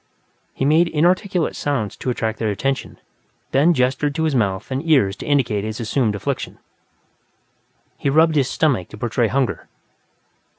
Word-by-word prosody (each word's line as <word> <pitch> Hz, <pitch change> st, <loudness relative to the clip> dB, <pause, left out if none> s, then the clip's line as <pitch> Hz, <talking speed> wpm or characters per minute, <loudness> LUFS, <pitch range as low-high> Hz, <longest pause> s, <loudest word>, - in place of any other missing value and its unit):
He 135 Hz, -, -1 dB
made 160 Hz, +4 st, +4 dB
inarticulate 175 Hz, +2 st, +1 dB
sounds 130 Hz, -8 st, -2 dB
to -, -, -4 dB
attract 110 Hz, -2 st, -2 dB
their 110 Hz, -, 0 dB
attention, 135 Hz, +7 st, -2 dB, 0.5 s
then 145 Hz, +6 st, +4 dB
gestured 140 Hz, 0 st, 0 dB
to 160 Hz, -, -1 dB
his 155 Hz, -2 st, +1 dB
mouth 105 Hz, -2 st, -1 dB
and 130 Hz, +3 st, -2 dB
ears 100 Hz, -11 st, +4 dB
to -, -, -8 dB
indicate 125 Hz, -8 st, +1 dB
his 110 Hz, +2 st, -5 dB
assumed 115 Hz, -1 st, 0 dB
affliction. 100 Hz, -, -4 dB, 1.4 s
He 140 Hz, -, 0 dB
rubbed 160 Hz, +2 st, +4 dB
his 140 Hz, -3 st, +2 dB
stomach 130 Hz, -, 0 dB
to -, -, -11 dB
portray 120 Hz, +1 st, 0 dB
hunger. 130 Hz, +1 st, -1 dB
135 Hz, 155 wpm, -20 LUFS, 110-150 Hz, 1.4 s, made